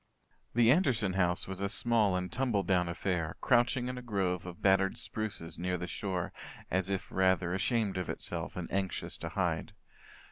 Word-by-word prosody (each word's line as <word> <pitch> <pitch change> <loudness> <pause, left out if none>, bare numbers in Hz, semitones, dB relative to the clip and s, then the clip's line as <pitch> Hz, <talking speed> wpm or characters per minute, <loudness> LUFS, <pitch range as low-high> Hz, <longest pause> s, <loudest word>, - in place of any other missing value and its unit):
The 120 0 +6
Anderson 130 - +3
house 90 -1 +1
was 95 0 -5
a 100 - 0
small 110 -3 +3
and 90 0 -2
tumbledown 100 -8 +1
affair, 85 -2 -1
crouching 125 0 +3
in 125 0 -4
a - - -8
grove 95 -6 -1
of 85 -1 -8
battered 95 0 +3
spruces 95 -7 -4
near 90 +1 -1
the 90 - -4
shore 90 -1 -3 0.4
as 95 +1 +1
if 95 -1 -3
rather 95 -1 +2
ashamed 100 +1 +1
of 90 - -3
itself - - -3
and 90 -2 -4
anxious 95 -2 -2
to - - -4
hide. - - -1
95 Hz, 170 wpm, -32 LUFS, 90-110 Hz, 0.4 s, The